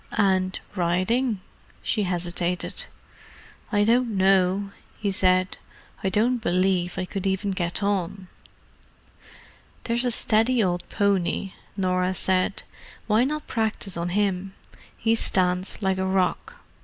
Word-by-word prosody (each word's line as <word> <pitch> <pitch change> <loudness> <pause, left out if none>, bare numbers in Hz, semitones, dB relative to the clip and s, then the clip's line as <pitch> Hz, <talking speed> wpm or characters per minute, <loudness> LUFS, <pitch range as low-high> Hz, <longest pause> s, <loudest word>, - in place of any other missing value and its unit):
"And 185 -2 +2 0.2
riding?" 185 +6 +1 0.4
she 210 - 0
hesitated. 175 0 -2 0.9
"I 205 -2 +3
don't 230 -1 +2
know," 190 +1 +3 0.3
he 205 -2 -1
said. 185 -1 +2 0.4
"I 190 - +2
don't 230 +6 +2
believe 180 -1 +1
I 185 - -1
could 195 +1 -3
even 195 +1 0
get 175 +1 -2
on." 195 -1 -1 1.6
"There's 235 +1 +1
a 250 - +2
steady 230 +1 +3
old 175 -1 -1
pony," 195 -1 0 0.2
Norah 185 -1 +1
said. 185 +2 0 0.4
"Why 220 +2 +3
not 300 +2 -3
practise 220 -4 -2
on 170 +1 -2
him? 195 0 -1 0.4
He 225 0 +2
stands 185 -2 0
like 190 -1 +1
a 190 - 0
rock. 190 -1 -1
190 Hz, 120 wpm, -25 LUFS, 185-210 Hz, 1.6 s, I